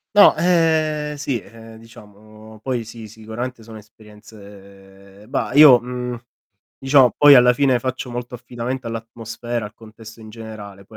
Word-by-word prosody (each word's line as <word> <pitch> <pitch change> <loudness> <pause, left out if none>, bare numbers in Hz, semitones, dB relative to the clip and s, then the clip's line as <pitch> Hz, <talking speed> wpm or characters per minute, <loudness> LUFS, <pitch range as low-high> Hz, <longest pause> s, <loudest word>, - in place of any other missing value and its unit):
No 205 - +7
ehm, 160 -3 0
sì, 140 -5 -4
ehm, 115 +1 -15
diciamo 110 0 -16
poi 125 -2 -3
sì, 115 0 -11
sicuramente 110 +3 -8
sono 110 0 -12
esperienze 100 -2 -17
bah, 130 -1 -3
io, 145 -4 +8
mhmm, 125 0 -6 0.6
diciamo 135 -2 +4
poi 145 -1 +8
alla 125 -1 +6
fine 130 0 +1
faccio 130 0 -5
molto 120 +1 -7
affidamento 120 +1 -6
all'atmosfera, 115 0 -6
al 105 - -15
contesto 115 0 -15
in 110 - -12
generale; 105 -3 -11
poi 110 - -15
115 Hz, 140 wpm, -20 LUFS, 110-130 Hz, 0.6 s, io